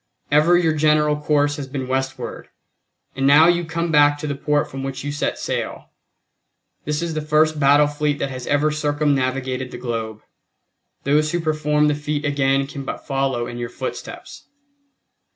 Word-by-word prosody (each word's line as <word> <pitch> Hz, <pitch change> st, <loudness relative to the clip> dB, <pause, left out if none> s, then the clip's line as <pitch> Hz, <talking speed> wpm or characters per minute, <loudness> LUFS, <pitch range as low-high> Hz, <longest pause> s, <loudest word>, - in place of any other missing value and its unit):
Ever 155 Hz, +4 st, +5 dB
your 165 Hz, -3 st, +2 dB
general 150 Hz, 0 st, +3 dB
course 145 Hz, 0 st, +1 dB
has 140 Hz, -2 st, -5 dB
been 130 Hz, -1 st, -5 dB
westward; 135 Hz, +1 st, -4 dB, 0.7 s
and 135 Hz, 0 st, +1 dB
now 150 Hz, +4 st, +7 dB
you 175 Hz, 0 st, +3 dB
come 165 Hz, +1 st, -2 dB
back 145 Hz, -1 st, +5 dB
to 150 Hz, -, -6 dB
the 145 Hz, -, -2 dB
port 145 Hz, +1 st, 0 dB
from 135 Hz, -, -6 dB
which 135 Hz, 0 st, -5 dB
you 145 Hz, -, -3 dB
set 145 Hz, -, -2 dB
sail. -, -, -4 dB, 0.9 s
This 150 Hz, +2 st, -1 dB
is 170 Hz, -1 st, -3 dB
the 155 Hz, -, -2 dB
first 155 Hz, 0 st, +2 dB
battle 145 Hz, +1 st, +5 dB
fleet 145 Hz, 0 st, -1 dB
that 140 Hz, -1 st, -3 dB
has 130 Hz, -1 st, -7 dB
ever 145 Hz, +1 st, +2 dB
circumnavigated 135 Hz, -4 st, -1 dB
the -, -, -8 dB
globe. 115 Hz, -3 st, -5 dB, 0.8 s
Those 150 Hz, +3 st, +2 dB
who 175 Hz, -, +1 dB
perform 150 Hz, -2 st, +1 dB
the 150 Hz, -, +2 dB
feat 150 Hz, 0 st, -3 dB
again 135 Hz, -1 st, +1 dB
can 140 Hz, 0 st, -7 dB
but -, -, -6 dB
follow 135 Hz, -3 st, -1 dB
in 120 Hz, 0 st, -7 dB
your 120 Hz, -1 st, -4 dB
footsteps. -, -, -7 dB
145 Hz, 170 wpm, -21 LUFS, 135-150 Hz, 0.9 s, now